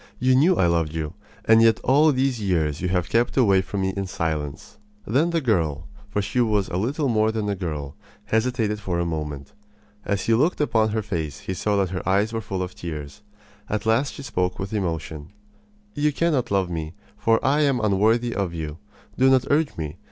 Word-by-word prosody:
You 130 Hz, +1 st, +3 dB
knew 160 Hz, +8 st, +5 dB
I -, -, +3 dB
loved 85 Hz, -2 st, +1 dB
you, 80 Hz, 0 st, -3 dB, 0.3 s
and 110 Hz, 0 st, +6 dB
yet 115 Hz, -1 st, +5 dB
all 150 Hz, +4 st, +5 dB
these 130 Hz, -3 st, 0 dB
years 80 Hz, -7 st, 0 dB
you 90 Hz, -, 0 dB
have 90 Hz, -2 st, 0 dB
kept 120 Hz, +3 st, +1 dB
away 100 Hz, -7 st, +5 dB
from 95 Hz, +1 st, -4 dB
me 95 Hz, 0 st, 0 dB
in 100 Hz, -1 st, -3 dB
silence." 80 Hz, -6 st, -4 dB, 0.3 s
Then 140 Hz, +10 st, +2 dB
the 170 Hz, -1 st, 0 dB
girl 85 Hz, -, 0 dB, 0.2 s
for 105 Hz, -1 st, -1 dB
she 125 Hz, +6 st, 0 dB
was 105 Hz, -4 st, +1 dB
little 130 Hz, -, -1 dB
more 110 Hz, -2 st, +2 dB
than 110 Hz, -2 st, -2 dB
a 100 Hz, -, 0 dB
girl 75 Hz, -7 st, -5 dB, 0.3 s
hesitated 110 Hz, -2 st, 0 dB
for 95 Hz, -4 st, -2 dB
a 85 Hz, -, 0 dB
moment. 75 Hz, -4 st, -5 dB, 0.5 s
As 100 Hz, -2 st, -1 dB
he 115 Hz, -, +2 dB
looked 150 Hz, +10 st, +2 dB
upon 110 Hz, -7 st, +2 dB
her 110 Hz, 0 st, -1 dB
face 80 Hz, -9 st, -4 dB
he 95 Hz, -, -4 dB
saw 105 Hz, +3 st, 0 dB
that 95 Hz, -3 st, +1 dB
her 90 Hz, -, -3 dB
eyes 100 Hz, +4 st, +2 dB
were 115 Hz, -, -2 dB
full 95 Hz, -2 st, -3 dB
of 90 Hz, 0 st, -6 dB
tears. 75 Hz, +1 st, -7 dB, 0.5 s
At 110 Hz, +1 st, -2 dB
last 115 Hz, +5 st, +1 dB
she 140 Hz, -, -8 dB
spoke 90 Hz, -8 st, -1 dB
with 95 Hz, +2 st, -5 dB
emotion: 80 Hz, -4 st, -4 dB, 0.6 s
"You 150 Hz, +1 st, +1 dB
cannot 150 Hz, -4 st, 0 dB
love 95 Hz, -3 st, 0 dB
me, 80 Hz, 0 st, -4 dB, 0.2 s
for 115 Hz, 0 st, +2 dB
I 145 Hz, +3 st, +3 dB
am 140 Hz, -4 st, +2 dB
unworthy 110 Hz, +3 st, +2 dB
of 95 Hz, -4 st, -2 dB
you. 80 Hz, 0 st, -5 dB, 0.4 s
Do 130 Hz, +1 st, +5 dB
not 130 Hz, -1 st, +4 dB
urge 150 Hz, +1 st, +1 dB
me. 80 Hz, 0 st, -5 dB
100 Hz, 205 wpm, -23 LUFS, 85-120 Hz, 0.6 s, and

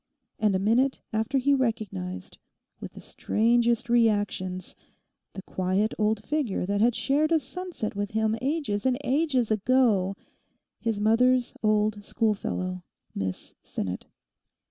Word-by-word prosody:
And 210 Hz, -2 st, +2 dB
a -, -, +3 dB
minute 235 Hz, +7 st, +2 dB
after 220 Hz, +5 st, 0 dB
he 280 Hz, +2 st, +3 dB
recognised 215 Hz, -, -3 dB, 0.4 s
with -, -, -8 dB
the -, -, -11 dB
strangest 235 Hz, +1 st, +1 dB
reactions 205 Hz, -6 st, +1 dB, 0.6 s
the 190 Hz, -, -8 dB
quiet 190 Hz, +4 st, 0 dB
old 215 Hz, 0 st, +1 dB
figure 280 Hz, -11 st, -1 dB
that 200 Hz, +2 st, 0 dB
had 235 Hz, +1 st, +4 dB
shared 300 Hz, +3 st, +1 dB
a 325 Hz, -, +5 dB
sunset 300 Hz, -, -5 dB
with 205 Hz, 0 st, -2 dB
him 220 Hz, 0 st, +1 dB
ages 265 Hz, -6 st, -1 dB
and 255 Hz, -1 st, +2 dB
ages 265 Hz, -5 st, +1 dB
ago—his 215 Hz, -1 st, -1 dB
mother's 245 Hz, +4 st, +3 dB
old 215 Hz, -1 st, +1 dB
schoolfellow, 185 Hz, -4 st, -1 dB, 0.3 s
Miss 95 Hz, -2 st, -4 dB
Sinnet. 95 Hz, -2 st, -5 dB
220 Hz, 120 wpm, -27 LUFS, 200-255 Hz, 0.6 s, a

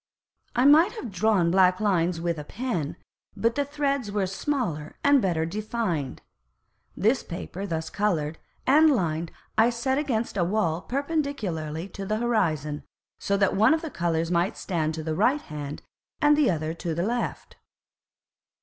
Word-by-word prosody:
I 245 Hz, +2 st, +3 dB
might 320 Hz, +8 st, +6 dB
have 340 Hz, -, -6 dB
drawn 190 Hz, -3 st, +2 dB
black 185 Hz, 0 st, +4 dB
Lines 180 Hz, -5 st, +1 dB
with 170 Hz, -1 st, -1 dB
a -, -, -5 dB
Pen, 175 Hz, -, -3 dB, 0.4 s
but 230 Hz, +1 st, +2 dB
the 285 Hz, -, 0 dB
Threds 280 Hz, -4 st, -1 dB
were 200 Hz, -1 st, 0 dB
smaller 190 Hz, -, -2 dB
and 285 Hz, -2 st, +5 dB
better 170 Hz, -5 st, +1 dB
defined. 185 Hz, -, -3 dB, 0.7 s
This 225 Hz, +7 st, +2 dB
Paper 185 Hz, +3 st, -6 dB
thus 160 Hz, -2 st, -3 dB
coloured 165 Hz, -7 st, -1 dB, 0.3 s
and 310 Hz, +4 st, +6 dB
lined 170 Hz, -, 0 dB, 0.3 s
I 225 Hz, +2 st, +6 dB
set 265 Hz, +3 st, 0 dB
against 235 Hz, -8 st, -1 dB
a 180 Hz, -, +3 dB
Wall 175 Hz, -3 st, 0 dB
perpendicularly 235 Hz, -, -2 dB
to 195 Hz, -, -7 dB
the 215 Hz, +1 st, 0 dB
Horizon, 160 Hz, -, 0 dB, 0.4 s
so 200 Hz, -, 0 dB
that 195 Hz, -1 st, +2 dB
one 220 Hz, +10 st, +5 dB
of 325 Hz, -, -5 dB
the 320 Hz, -, -5 dB
Colours 165 Hz, -1 st, -1 dB
might 175 Hz, +4 st, +1 dB
stand 160 Hz, -4 st, -1 dB
to 160 Hz, -, -5 dB
the 160 Hz, 0 st, -2 dB
Right 270 Hz, -, +2 dB
Hand, 145 Hz, -1 st, -7 dB, 0.4 s
and 295 Hz, -1 st, +5 dB
the 295 Hz, -5 st, +3 dB
other 160 Hz, -2 st, -1 dB
to 170 Hz, -1 st, -4 dB
the 170 Hz, -, 0 dB
Left. 240 Hz, +3 st, -3 dB
195 Hz, 160 wpm, -26 LUFS, 165-245 Hz, 0.7 s, might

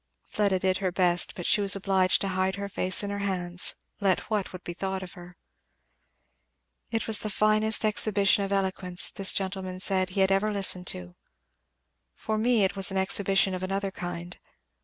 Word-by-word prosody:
Fleda 200 Hz, -3 st, -1 dB
did 185 Hz, 0 st, -1 dB
her 190 Hz, -2 st, -3 dB
best, 175 Hz, -1 st, +2 dB
but 175 Hz, -4 st, -8 dB
she 210 Hz, -, +2 dB
was 200 Hz, 0 st, +2 dB
obliged 190 Hz, -1 st, 0 dB
to 195 Hz, -, -2 dB
hide 185 Hz, 0 st, -2 dB
her 200 Hz, 0 st, -6 dB
face 185 Hz, 0 st, +2 dB
in 200 Hz, -, -4 dB
her 200 Hz, -, -5 dB
hands, 180 Hz, -3 st, 0 dB, 0.2 s
let 195 Hz, +1 st, -1 dB
what 210 Hz, -3 st, -2 dB
would 185 Hz, -1 st, -11 dB
be 175 Hz, -, -7 dB
thought 190 Hz, +1 st, -5 dB
of 180 Hz, -, -10 dB
her. 175 Hz, 0 st, -14 dB, 1.5 s
"It 225 Hz, -1 st, -3 dB
was 220 Hz, -2 st, +4 dB
the 215 Hz, -, -4 dB
finest 215 Hz, +2 st, 0 dB
exhibition 205 Hz, -2 st, +2 dB
of 195 Hz, -, -5 dB
eloquence, 190 Hz, -2 st, +3 dB
this 195 Hz, -1 st, +3 dB
gentleman 190 Hz, -1 st, -4 dB
said, 185 Hz, -1 st, +3 dB
he 195 Hz, +1 st, -2 dB
had 190 Hz, 0 st, +2 dB
ever 200 Hz, +2 st, 0 dB
listened 190 Hz, -3 st, 0 dB
to. 90 Hz, -1 st, -5 dB, 1.0 s
For 215 Hz, 0 st, -4 dB
me 230 Hz, -1 st, +1 dB
it 190 Hz, -, -1 dB
was 195 Hz, -1 st, +3 dB
an 190 Hz, -, -4 dB
exhibition 195 Hz, 0 st, +3 dB
of 185 Hz, -, -5 dB
another 195 Hz, +1 st, -3 dB
kind. 175 Hz, -1 st, -8 dB
190 Hz, 185 wpm, -26 LUFS, 185-200 Hz, 1.5 s, was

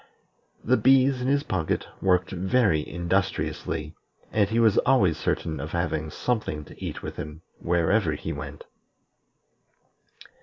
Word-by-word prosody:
The 130 Hz, +3 st, +3 dB
bees 135 Hz, 0 st, +4 dB
in 125 Hz, -, -1 dB
his 140 Hz, +1 st, +2 dB
pocket 90 Hz, -, -1 dB, 0.2 s
worked 90 Hz, -1 st, +2 dB
very 95 Hz, -2 st, +2 dB
industriously, 85 Hz, -3 st, -2 dB, 0.4 s
and 105 Hz, -2 st, +2 dB
he 115 Hz, +2 st, +1 dB
was 110 Hz, -3 st, +5 dB
always 100 Hz, -, +3 dB
certain 80 Hz, -1 st, -2 dB
of 75 Hz, +3 st, -6 dB
having 80 Hz, -3 st, -1 dB
something 75 Hz, -7 st, -2 dB
to -, -, -12 dB
eat -, -, -5 dB
with -, -, -6 dB
him 75 Hz, +2 st, -7 dB, 0.2 s
wherever 85 Hz, +1 st, +2 dB
he 75 Hz, -, -4 dB
went. 70 Hz, 0 st, -7 dB
90 Hz, 130 wpm, -26 LUFS, 80-110 Hz, 0.4 s, was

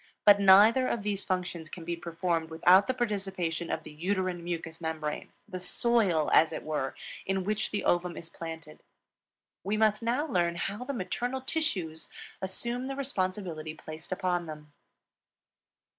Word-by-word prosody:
But 205 Hz, -1 st, +8 dB
neither 210 Hz, +6 st, +7 dB
of 225 Hz, -, -1 dB
these 200 Hz, -1 st, -1 dB
functions 180 Hz, -3 st, -2 dB
can 170 Hz, -3 st, -8 dB
be 170 Hz, 0 st, -2 dB
performed 170 Hz, -1 st, -2 dB
without 180 Hz, +4 st, +5 dB
the 260 Hz, -, +1 dB
participation 195 Hz, -8 st, -2 dB
of -, -, -2 dB
the 155 Hz, -, -10 dB
uterine 180 Hz, +2 st, -1 dB
mucous 165 Hz, -1 st, -5 dB
membrane, 155 Hz, -2 st, -3 dB, 0.2 s
the 185 Hz, -3 st, -5 dB
soil, 185 Hz, -5 st, +2 dB
as 160 Hz, -, +6 dB
it -, -, -5 dB
were, 150 Hz, -4 st, -2 dB, 0.3 s
in 190 Hz, 0 st, -1 dB
which 215 Hz, +2 st, -1 dB
the 210 Hz, -, -2 dB
ovum 175 Hz, 0 st, +1 dB
is 165 Hz, -, -7 dB
planted. 165 Hz, -, -8 dB, 0.8 s
We 205 Hz, +4 st, 0 dB
must 215 Hz, 0 st, +3 dB
now 245 Hz, +6 st, +1 dB
learn 175 Hz, -, +1 dB
how 205 Hz, +7 st, -3 dB
the 280 Hz, -, -3 dB
maternal 245 Hz, +4 st, -2 dB
tissues 185 Hz, -, -2 dB, 0.3 s
assume 235 Hz, +7 st, -2 dB
the 270 Hz, -, -3 dB
responsibility 185 Hz, -, -3 dB
placed 155 Hz, +2 st, -10 dB
upon 180 Hz, -2 st, 0 dB
them. 150 Hz, -1 st, -9 dB
185 Hz, 155 wpm, -29 LUFS, 165-210 Hz, 0.8 s, But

